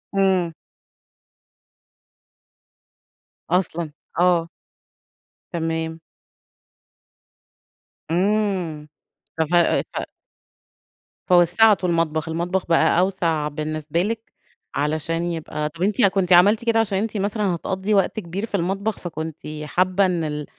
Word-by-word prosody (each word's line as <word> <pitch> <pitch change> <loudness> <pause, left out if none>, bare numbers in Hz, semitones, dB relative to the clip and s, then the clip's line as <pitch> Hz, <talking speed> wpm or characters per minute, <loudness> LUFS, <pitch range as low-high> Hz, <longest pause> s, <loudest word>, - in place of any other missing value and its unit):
إمم. 190 -3 +2 3.0
أصلًا! 170 -3 0 0.3
آه. 175 -2 +3 1.0
تمام. 160 -1 -2 2.1
إمم، 185 -5 0 0.5
ف - - +4
ف 170 +3 -1 0.4
ف - - 0 1.3
فوسَّعتوا 185 +2 +4
المطبخ، 160 -1 0
المطبخ 175 +3 -1
بقى 165 0 +3
أوْسع 170 -5 +1
بالنسبة 155 +2 -2
لِك 225 +3 -4 0.4
علشان 155 +3 -1
يبقى 155 -2 -3
طب 170 +3 -13
أنتِ 205 0 +3
كُنتِ 190 -2 +2
عملتِ 205 +6 +5
كده 225 -1 +3
عشان 205 -3 +1
أنتِ 215 +1 -2
مثلًا 200 -2 0
هتقضّي 190 +4 -2
وقت 200 +2 +2
كبير 190 +4 -4
في 210 - -4
المطبخ، 195 +4 -1
فكُنتِ 160 -2 -5 0.3
حابة 185 +5 +2
إن 175 -3 0
ال 150 -1 -3
175 Hz, 100 wpm, -22 LUFS, 160-195 Hz, 3.0 s, عملتِ